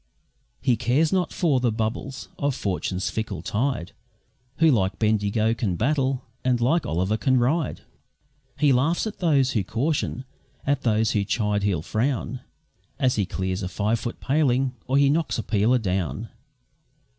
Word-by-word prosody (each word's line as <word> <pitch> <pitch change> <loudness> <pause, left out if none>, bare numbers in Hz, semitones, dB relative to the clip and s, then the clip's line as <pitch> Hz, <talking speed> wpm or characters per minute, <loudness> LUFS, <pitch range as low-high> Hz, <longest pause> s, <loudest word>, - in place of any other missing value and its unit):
He 120 -3 +2
cares 145 - +2
not 180 -3 +1
for 150 -7 +2
the 125 -2 +1
bubbles 115 +4 -3
of 140 -2 0
Fortune's 95 -3 -2
fickle 105 -7 -4
tide, 110 -2 -1 0.7
Who 160 -1 +5
like 95 -6 +1
Bendigo 110 0 +1
can 110 -6 -1
battle, 135 - 0 0.2
and 125 -1 +2
like 145 +8 +2
Olliver 95 +6 0
can 130 +5 +3
ride. 135 +5 0 0.8
He 145 -3 +4
laughs 145 - +2
at 220 - -5
those 140 -7 +3
who 105 - 0
caution, 130 - -1 0.4
at 140 -1 +1
those 110 -2 +2
who 105 - +1
chide 105 0 0
he'll 95 -6 0
frown, 125 +3 -1 0.6
As 130 -1 +2
he 100 -3 +1
clears 95 0 -2
a 95 - -2
five 110 +4 0
foot 120 - -5
paling, 135 -2 +1
or 135 +2 +2
he 140 0 +5
knocks 155 +3 +1
a 115 - -2
peeler 110 +4 +2
down. 95 - -2
120 Hz, 155 wpm, -24 LUFS, 105-135 Hz, 0.8 s, Who